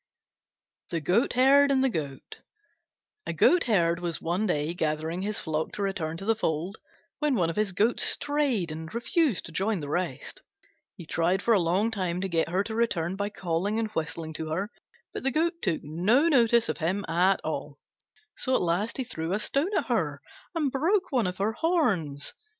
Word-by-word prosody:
THE 170 - -1
GOATHERD 255 - +4
AND 265 -1 +3
THE 265 - +3
GOAT 145 -7 -6 0.9
A - - -2
Goatherd 195 - +3
was 170 -2 -3
one 180 +6 -1
day 155 -2 0
gathering 160 +1 -2
his 205 +1 -2
flock 155 -2 -2
to 205 - -3
return 165 -5 -2
to 195 - -7
the 225 - +4
fold, 180 -2 -2 0.4
when 300 -3 +1
one 170 -6 +1
of - - -9
his 210 -2 0
goats 215 +6 +2
strayed 280 - +1
and 160 +1 -7
refused 245 - +1
to - - -8
join 195 +4 0
the 145 -2 -6
rest. 175 -4 -3 0.6
He 170 - -9
tried 175 +5 0
for 235 - +4
a 205 - +4
long 185 +6 +1
time 180 -4 -2
to 195 - -1
get 165 -2 0
her 185 +3 +1
to 220 - -6
return 190 -7 0
by 200 +1 -2
calling 185 +2 -2
and 225 -1 -1
whistling 160 -3 -4
to 155 0 -5
her, 195 +7 -2 0.4
but - - -4
the 270 - +1
Goat 335 +4 0
took 165 - -1
no 190 - +2
notice 235 -6 +4
of - - -3
him 185 +5 -1
at 180 +3 +3
all; 145 -2 -4 0.6
so 260 -1 0
at - - +2
last 180 +6 0
he 265 - -1
threw 170 -7 -4
a 205 - 0
stone 275 - 0
at - - 0
her - - -1 0.4
and 300 -5 0
broke 360 +8 +1
one 245 -8 +2
of 180 0 -4
her 210 +3 0
horns. 220 - 0
195 Hz, 190 wpm, -27 LUFS, 165-235 Hz, 0.9 s, GOATHERD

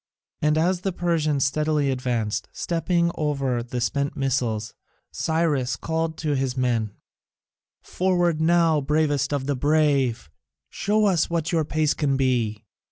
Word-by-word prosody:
And 150 +1 +2
as 175 +3 +1
the 195 - -1
Persians 155 -6 0
steadily 150 0 +1
advanced, 115 -4 -2
stepping 170 0 0
over 140 -5 -1
the 125 +1 -5
spent 140 +5 -1
missiles, 120 -5 -1 0.4
Cyrus 155 -6 0
called 160 0 -2
to 150 -3 -1
his 130 -1 -2
men: 115 -5 0 0.9
"Forward 175 -3 0
now, 165 -2 +3
bravest 145 -1 +1
of 140 -2 -1
the 140 0 0
brave! 140 - +1 0.4
Show 210 +1 +1
us 180 -6 +2
what 165 -2 -1
your 165 -3 +1
pace 155 0 +1
can 140 -3 0
be!" 120 -5 0
145 Hz, 135 wpm, -24 LUFS, 130-160 Hz, 0.9 s, now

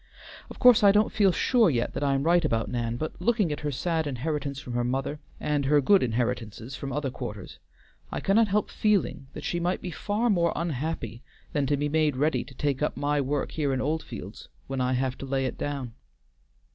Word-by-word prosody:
Of - - -10
course 250 -3 +7
I 200 - +8
don't 210 +2 +3
feel 200 -3 +4
sure 225 +3 +3
yet 120 -5 -1
that - - -3
I 140 -1 +2
am 135 - 0
right 170 +2 +4
about 115 -7 0
Nan, 120 -1 -2
but 155 +5 -5
looking 210 -4 +2
at 150 - -3
her 150 - -2
sad 160 +3 -1
inheritance 140 +1 -3
from 125 -4 -7
her 120 0 0
mother, 135 +4 -2 0.2
and 145 -2 0
her 145 +2 +4
good 195 +8 +5
inheritances 120 0 -2
from 140 - -5
other 140 -1 -2
quarters, 105 -7 -7 0.5
I - - -2
cannot 215 +3 +3
help 205 +2 0
feeling 205 -10 +1
that - - -8
she 175 - -1
might 175 +2 0
be 180 - -6
far 215 +6 0
more 170 -4 +2
unhappy 145 -7 -3 0.3
than 145 -3 +1
to 145 +1 +1
be 145 +1 0
made 155 -1 +2
ready 150 +4 +1
to 130 - -14
take 140 0 -1
up 150 - -1
my 145 0 +1
work 140 +1 -1
here 145 -4 0
in 130 - -1
Oldfields 130 - -4 0.2
when 135 -1 -3
I 125 0 +1
have 130 0 -1
to - - -5
lay 135 0 0
it 130 - -3
down. 140 -5 -3
145 Hz, 215 wpm, -27 LUFS, 130-170 Hz, 0.5 s, I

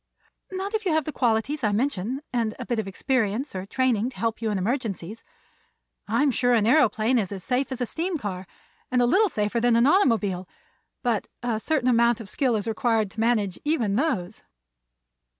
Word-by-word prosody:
"Not 380 +2 -4
if 435 0 -1
you 360 -5 +1
have 315 -2 +1
the 310 - -3
qualities 250 +3 0
I 210 - +2
mention 245 +3 -1
and 230 -3 0
a - - -6
bit 240 -2 -1
of 215 - -3
experience 235 +4 -1
or 190 0 -5
training 245 -1 +1
to 260 - -14
help 225 +3 -2
you 225 - 0
in 210 - 0
emergencies. 215 -1 -3 0.8
I'm 285 -1 +2
sure 245 0 +2
an 215 -3 +2
aëroplane 240 -2 +3
is 195 -3 -2
as 190 -3 -6
safe 265 +1 -1
as 255 - -4
a - - +2
steam 335 +7 -2
car, 190 -7 -5 0.4
and 250 - +1
a 245 - +4
little 395 - +4
safer 210 -1 -1
than 240 0 +3
an 235 +1 +4
automobile; 220 - +2 0.5
but 235 -5 0 0.2
a 235 -3 -1
certain 275 0 0
amount 235 -1 +3
of 215 -3 -9
skill 260 -5 +1
is 210 +1 -2
required 225 -2 +1
to - - -10
manage 220 -5 +1
even 245 -10 0
those." 225 - -1
235 Hz, 195 wpm, -25 LUFS, 210-265 Hz, 0.8 s, a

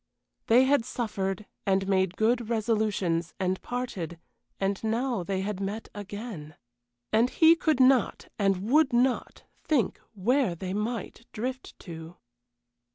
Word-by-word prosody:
They 245 +3 +6
had 275 -1 +3
suffered, 210 -5 -3 0.2
and 195 -1 +1
made 190 -2 +1
good 230 +1 +1
resolutions, 210 -7 0
and 185 0 0
parted, 200 -9 -4 0.4
and 195 +1 -1
now 230 0 0
they 190 +2 -2
had 200 0 -3
met 200 +3 -4
again. 205 -7 -7 0.6
And 230 +3 +4
he 325 +3 +6
could 315 -4 +1
not, 260 -1 +3
and 195 -1 +1
would 305 -3 +4
not, 250 +1 +1 0.2
think 270 - +1
where 230 0 +2
they 185 +2 -5
might 225 +2 -4
drift 255 +4 -5
to. 165 -1 -9
215 Hz, 130 wpm, -28 LUFS, 190-245 Hz, 0.6 s, They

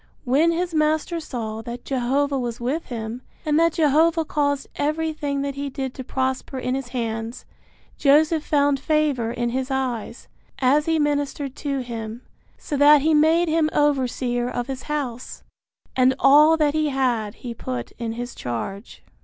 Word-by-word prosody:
When 295 +6 +3
his 345 +1 -2
master 310 +2 +1
saw 225 -7 -5
that 240 +1 -8
Jehovah 275 +2 0
was 240 -2 -4
with 270 +8 -2
him, 230 0 -5 0.2
and 305 0 +2
that 335 -1 +3
Jehovah 320 +2 +3
caused 285 -2 0
everything 300 -2 -1
that 280 0 -2
he 280 +1 -4
did 265 -1 -4
to 260 - -7
prosper 260 +1 -2
in 255 0 -2
his 265 -1 -3
hands, 230 -1 -4 0.5
Joseph 310 +2 +4
found 285 -2 +2
favor 285 -6 +1
in 240 0 -2
his 260 +2 -2
eyes, 255 -4 -3 0.3
as 280 +4 +2
he 325 0 +2
ministered 290 -2 -1
to 280 -2 -2
him, 230 -1 -6 0.3
so 295 - -5
that 290 0 +7
he 315 +1 +3
made 320 +3 +4
him 315 -1 +2
overseer 255 -4 +1
of 245 -1 -3
his 265 0 -5
house, 260 -5 -4 0.5
and 255 0 +4
all 300 +4 +6
that 300 -2 +2
he 310 -1 +1
had 245 -6 0
he 240 -2 -7
put 125 - -5
in 230 -1 -3
his 245 +1 -5
charge. 195 - -6
275 Hz, 160 wpm, -23 LUFS, 245-300 Hz, 0.5 s, that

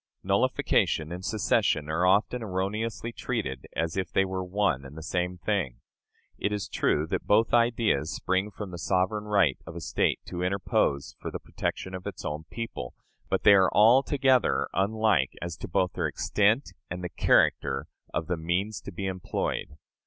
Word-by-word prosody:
Nullification 80 +1 +1
and 90 +1 -6
secession 95 -7 +1
are 85 +4 +1
often 105 +6 +2
erroneously 110 +4 -2
treated 105 - -4
as 80 -1 -1
if 95 -1 -2
they 95 - +3
were 95 0 -3
one 90 -7 0
and 70 +3 -11
the 80 - -7
same 90 +1 -2
thing. 90 - -1 0.6
It 100 - 0
is 105 -1 -2
true 75 - +1
that - - -3
both 110 +3 +3
ideas 115 - +2
spring 95 +2 0
from 105 -2 -7
the 85 - -7
sovereign 95 +6 0
right 100 -10 +2
of 80 - -8
a - - -4
State 80 - 0
to 90 - -5
interpose 90 -7 0
for - - -5
the - - -4
protection 95 - -4
of 95 0 -6
its - - -7
own 75 +1 -4
people, 115 - -6 0.3
but - - 0
they 100 - +8
are 95 -3 +5
altogether 130 +3 +4
unlike 100 -7 +2
as 85 -1 -5
to - - -6
both 90 +1 0
their - - 0
extent 105 +7 +1 0.2
and 90 +1 -5
the 90 - -3
character 70 -4 +2 0.3
of 80 - -2
the 90 +1 -2
means 90 +6 -1
to - - -8
be 95 +3 -5
employed. 90 -5 -3
95 Hz, 175 wpm, -28 LUFS, 85-105 Hz, 0.6 s, they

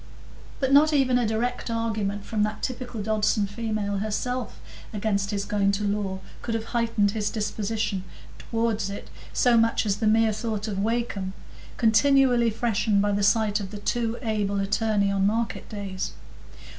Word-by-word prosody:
But 270 -1 +1
not 305 +2 +6
even 260 -3 +3
a 240 - +1
direct 235 +3 -1
argument 215 -3 -2
from 215 -2 -1
that 210 +1 -1
typical 245 -4 -4
Dodson 215 0 +1
female 205 -1 -2
herself 220 +4 -3 0.3
against 200 -2 0
his 200 -1 -2
going 200 -1 +2
to 205 +1 -1
law 200 -2 -1 0.2
could 230 - -2
have 225 - -2
heightened 230 -4 +2
his 210 -1 -1
disposition 215 -2 -2 0.4
toward 225 -1 -1
it 200 - -8 0.2
so 245 -2 +4
much 230 0 +3
as 200 -1 +1
the 220 0 0
mere 220 0 +4
thought 215 0 -3
of 200 -3 -3
Wakem, 210 -3 -1 0.4
continually 245 0 +4
freshened 220 -2 +1
by 205 +1 +2
the 200 0 0
sight 210 0 +3
of 195 -2 -5
the 210 - -7
too 230 +2 -1
able 205 -3 0
attorney 200 0 +1
on 195 0 +2
market 225 +2 -2
days. 195 -3 -4
215 Hz, 160 wpm, -26 LUFS, 205-230 Hz, 0.4 s, not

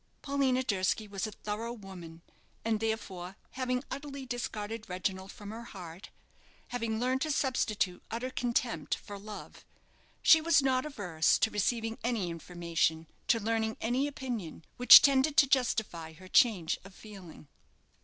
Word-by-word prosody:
Paulina 270 -2 +1
Durski 200 0 0
was 200 +1 -3
a - - -7
thorough 215 +3 -5
woman; 180 -6 -11 0.4
and, 225 -1 +1
therefore, 195 -5 -4 0.2
having 255 0 -2
utterly 280 -1 -6
discarded 225 -3 -5
Reginald 190 +1 -3
from 205 0 -9
her 225 +1 -7
heart, 180 -2 -10 0.6
having 230 -3 -2
learned 255 +2 0
to 310 - -1
substitute 215 -10 0
utter 245 +3 -4
contempt 245 -1 -1
for 205 -2 -10
love, 210 +1 -10 0.6
she 320 - +7
was 325 -2 +4
not 265 0 +1
averse 180 - +1
to 220 - +1
receiving 225 +2 -1
any 225 -7 -1
information, 165 -1 -1 0.2
to 230 - +3
learning 220 0 -1
any 250 +5 0
opinion, 240 - -6
which 250 - +10
tended 280 +2 +3
to 290 - +8
justify 220 -11 0
her 185 +4 -14
change 185 -6 +3
of 195 0 -14
feeling. 190 -8 -12
220 Hz, 145 wpm, -31 LUFS, 190-255 Hz, 0.6 s, which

